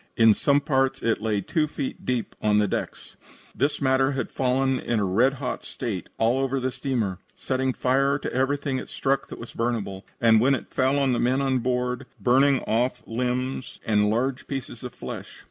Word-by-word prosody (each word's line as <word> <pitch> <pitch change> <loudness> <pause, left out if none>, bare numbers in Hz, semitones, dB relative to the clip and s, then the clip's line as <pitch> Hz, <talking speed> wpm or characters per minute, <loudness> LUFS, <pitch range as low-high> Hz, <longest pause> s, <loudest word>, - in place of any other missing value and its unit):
In 115 -1 +7
some 140 +6 +2
parts 135 -2 +1
it 115 -2 +1
lay 105 -2 0
two 155 - 0
feet 145 -2 -5
deep 125 -3 -1
on 105 -1 +3
the 105 -1 +3
decks. - - -5 0.4
This 145 +2 0
matter 135 0 +2
had 135 - -3
fallen 130 0 +1
in 120 -2 -1
a 100 - +1
red 115 +9 +3
hot 135 -1 -4
state 100 -7 -4
all 115 +4 +2
over 135 0 0
the 130 0 -1
steamer, 115 -9 -2 0.2
setting 130 0 -1
fire 135 +3 +2
to - - -5
everything 135 +1 0
it - - -7
struck 135 0 -1
that - - -8
was 115 - -9
burnable, 115 -5 -2 0.2
and, 110 -2 +5
when 135 +3 +4
it - - -8
fell 135 +1 +2
on 135 -2 +2
the 120 - 0
men 130 +2 +2
on 135 -2 +1
board, 125 0 -1
burning 135 +2 +4
off 120 +3 0
limbs 125 +2 -2
and 105 -1 +3
large 125 +4 -1
pieces 135 -4 -5
of 125 - -7
flesh. - - -7
130 Hz, 195 wpm, -25 LUFS, 115-135 Hz, 0.4 s, In